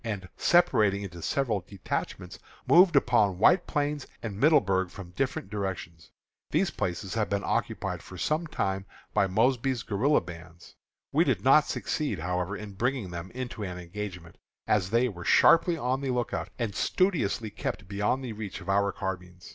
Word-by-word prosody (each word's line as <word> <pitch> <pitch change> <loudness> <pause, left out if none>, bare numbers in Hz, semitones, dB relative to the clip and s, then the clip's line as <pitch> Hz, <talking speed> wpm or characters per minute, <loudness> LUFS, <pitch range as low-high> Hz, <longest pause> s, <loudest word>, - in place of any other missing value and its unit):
and, 105 -5 -4
separating 110 - +3
into 85 -3 -8
several 110 - 0
detachments, 90 -2 -5 0.3
moved 175 -1 +6
upon 110 -8 +3
White 175 - +4
Plains 145 -1 -1 0.2
and 110 -4 -4
Middleburg 100 - +3
from 90 -1 -10
different 125 -3 -3
directions. 95 -5 -5 0.4
These - - +1
places 90 +1 -3
have 110 -2 0
been 100 0 -1
occupied - - -2
for 95 - -11
some 155 - 0
time 95 -9 -2
past - - -25
by 100 - +3
Mosby's 120 +4 +1
guerilla 120 +8 +2
bands. 85 -1 -12 0.4
We - - +4
did - - 0
not - - +6
succeed, - - -2
however, 90 +4 -2
in 105 -1 -8
bringing 120 -2 -1
them 85 +1 -6
into 125 -3 -5
an 90 -3 -4
engagement, 90 -1 -7 0.3
as 95 -3 +1
they 120 +4 +3
were 90 -6 -7
sharply 165 - +5
on 130 0 -1
the 135 - -2
lookout, 125 -1 -2
and 115 -4 -2
studiously 130 - 0
kept 100 -1 -4
beyond 105 +7 -1
the 115 - -5
reach 105 -2 -6
of 95 - -10
our 100 0 +2
carbines. 90 -3 -6
100 Hz, 165 wpm, -28 LUFS, 95-125 Hz, 0.4 s, moved